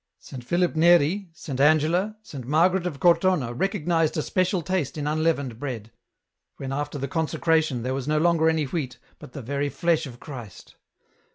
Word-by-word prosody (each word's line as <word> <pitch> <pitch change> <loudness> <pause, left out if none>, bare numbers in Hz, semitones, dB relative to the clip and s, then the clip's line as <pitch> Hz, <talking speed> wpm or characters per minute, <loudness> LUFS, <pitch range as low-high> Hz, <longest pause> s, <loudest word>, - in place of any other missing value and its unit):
Saint 125 -3 -10
Philip 175 +6 0
Neri, 175 +3 +4
Saint 145 -5 -7
Angela, 160 +8 +3
Saint 135 - -9
Margaret 175 +5 +2
of 145 -6 -6
Cortona 170 -7 +3
recognized 165 0 0
a 155 - 0
special 185 -1 0
taste 170 -4 -2
in 145 - -3
unleavened 150 -6 0
bread, 115 -6 -5 0.7
when 135 0 -5
after 145 +1 -3
the 140 0 -3
consecra 160 +2 +1
tion 130 -6 -4
there 130 +1 -2
was 135 0 -4
no 155 0 +1
longer 165 0 +3
any 160 -1 +1
wheat, 135 -3 -4 0.2
but - - -12
the 140 - -7
very 140 +4 -2
flesh 165 0 0
of 120 -2 -11
Christ. 120 -9 -10
155 Hz, 175 wpm, -25 LUFS, 135-170 Hz, 0.7 s, Neri